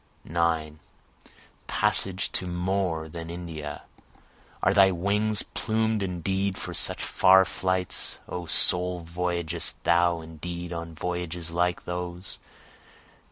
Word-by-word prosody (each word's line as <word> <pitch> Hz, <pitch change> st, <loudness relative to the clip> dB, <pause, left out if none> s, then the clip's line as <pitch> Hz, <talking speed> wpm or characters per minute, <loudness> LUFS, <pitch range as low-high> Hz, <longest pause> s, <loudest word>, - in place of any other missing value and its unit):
9 80 Hz, -2 st, 0 dB, 0.9 s
Passage 95 Hz, 0 st, +2 dB
to 90 Hz, -, 0 dB
more 90 Hz, -2 st, -1 dB
than 85 Hz, +1 st, -7 dB
India! 80 Hz, -4 st, -6 dB, 0.8 s
Are -, -, +4 dB
thy 95 Hz, -1 st, +7 dB
wings 100 Hz, +4 st, +1 dB
plumed 110 Hz, -1 st, 0 dB
indeed 95 Hz, +1 st, -1 dB
for -, -, -5 dB
such -, -, 0 dB
far 95 Hz, 0 st, +6 dB
flights? 95 Hz, +1 st, -2 dB
O 90 Hz, -1 st, -5 dB
soul, 90 Hz, +3 st, +3 dB
voyagest 85 Hz, 0 st, -2 dB
thou 85 Hz, 0 st, +3 dB
indeed 85 Hz, +2 st, -6 dB
on 85 Hz, -1 st, -6 dB
voyages 90 Hz, 0 st, -3 dB
like 90 Hz, +1 st, 0 dB
those? 90 Hz, +1 st, -5 dB
90 Hz, 110 wpm, -27 LUFS, 85-95 Hz, 0.9 s, thy